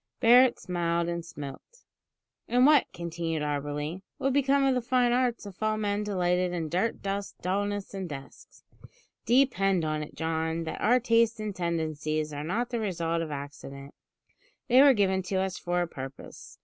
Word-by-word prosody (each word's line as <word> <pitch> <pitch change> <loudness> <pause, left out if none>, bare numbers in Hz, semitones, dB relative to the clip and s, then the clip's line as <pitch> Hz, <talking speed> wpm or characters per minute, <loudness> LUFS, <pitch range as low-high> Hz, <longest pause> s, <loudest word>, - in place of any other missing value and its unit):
Barret 250 +1 +6
smiled 170 -1 -1
and 170 0 -3
smoked. 165 - -10 0.6
"And 250 +1 +4
what," 295 -2 +5
continued 165 -2 -3
Auberly, 145 +4 -3 0.2
"would 270 0 0
become 280 0 +3
of 270 -1 +3
the 250 - 0
fine 245 0 +2
arts 245 -3 0
if 200 0 -11
all 215 0 +1
men 205 -1 -1
delighted 180 -3 0
in 165 -3 -3
dirt, 190 +8 -1
dust, 200 0 -4
dullness, 205 +2 -2
and 190 -3 -5
desks? 135 -2 -11 0.6
Depend 210 -8 +3
upon 155 -1 -1
it, 150 - -8
John, 160 0 -2
that 160 - -5
our 245 +4 +4
tastes 230 -1 +2
and 210 -2 -4
tendencies 155 -3 -2
are 145 0 -4
not 230 +10 -2
the 235 - -1
result 170 -5 -1
of 165 - -4
accident; 140 -1 -8 0.7
they 255 +1 +6
were 280 -2 +7
given 190 -2 +2
to 190 +1 -4
us 190 0 -1
for 175 0 0
a - - -4
purpose. 135 -3 -10
185 Hz, 170 wpm, -28 LUFS, 160-230 Hz, 0.7 s, were